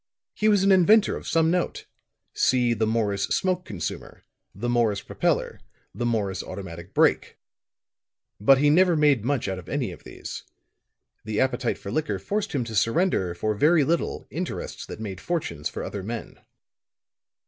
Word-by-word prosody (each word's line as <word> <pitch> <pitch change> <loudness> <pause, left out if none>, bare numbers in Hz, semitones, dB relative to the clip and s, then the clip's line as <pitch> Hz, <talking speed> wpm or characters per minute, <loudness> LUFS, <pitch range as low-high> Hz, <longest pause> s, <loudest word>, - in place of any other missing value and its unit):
He 215 - +2
was 205 -2 +4
an 195 - +4
inventor 200 +4 +5
of - - -8
some 165 0 +3
note. 180 -1 -1 0.5
See 125 -2 +2
the 110 -1 0
Morris 105 -3 0
Smoke 185 -1 0
Consumer 95 -5 -6 0.3
the 110 +5 -3
Morris 115 -4 +1
Propeller - - -1 0.3
the 120 - -2
Morris 105 -5 -1
Automatic 90 -2 -8
Brake. - - +2 1.0
But 135 +6 +6
he 145 +2 +4
never 180 +2 +5
made 145 -7 +3
much 130 -2 0
out 95 -1 -3
of 85 - -12
any - - -1
of - - -12
these. - - -8 0.8
The 110 -1 -2
appetite 130 -2 0
for 100 - -7
liquor 155 -1 -1
forced 210 0 -3
him 135 -4 0
to 115 -1 -6
surrender, 115 - +1
for 110 +5 -1
very 150 +8 +4
little, 165 +4 -1
interests - - -5
that - - -8
made 100 -4 -6
fortunes 160 - -3
for - - -6
other 100 - -5
men. 115 +3 -6
120 Hz, 160 wpm, -25 LUFS, 100-165 Hz, 1.0 s, But